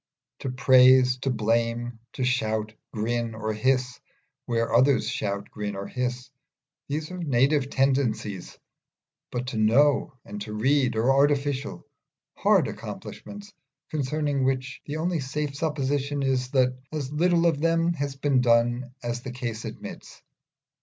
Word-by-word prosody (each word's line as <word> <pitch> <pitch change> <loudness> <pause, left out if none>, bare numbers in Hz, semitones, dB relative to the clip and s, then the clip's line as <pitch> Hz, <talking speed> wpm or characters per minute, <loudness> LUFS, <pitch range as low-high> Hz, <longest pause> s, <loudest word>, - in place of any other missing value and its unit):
To 135 - -4
praise, 130 -1 +5
to 135 - -1
blame, 115 0 0
to 130 - -3
shout, 110 -4 0 0.2
grin, 115 +1 -2
or 110 0 -2
hiss, 125 +2 0 0.5
where 115 -2 0
others 130 +4 +4
shout, 100 0 -3
grin, 105 -1 -4
or 100 0 -5
hiss 125 +1 -4 0.6
these 155 +3 -3
are 180 - -6
native 140 -2 +2
tendencies; 130 -9 0 0.7
but 125 0 -3
to 120 - -5
know 135 +5 +3
and 105 0 -7
to 105 +1 -6
read 130 +3 +2
are 115 +4 +3
artificial, 140 0 +1 0.5
hard - - +3
accomplishments, 205 0 -8 0.4
concerning 145 -1 -1
which 130 0 -1
the 150 +1 -3
only 170 +1 -1
safe 140 +2 -3
supposition 145 -2 -1
is, 130 -2 0
that 130 -2 +2 0.2
as 145 -3 -4
little 170 +2 +3
of 160 -4 +2
them 165 +1 +2
has 140 -3 -3
been 135 -2 +2
done 120 +1 +2
as 120 0 -3
the 130 - -6
case 120 -3 -5
admits. - - -9
130 Hz, 140 wpm, -26 LUFS, 120-145 Hz, 0.7 s, praise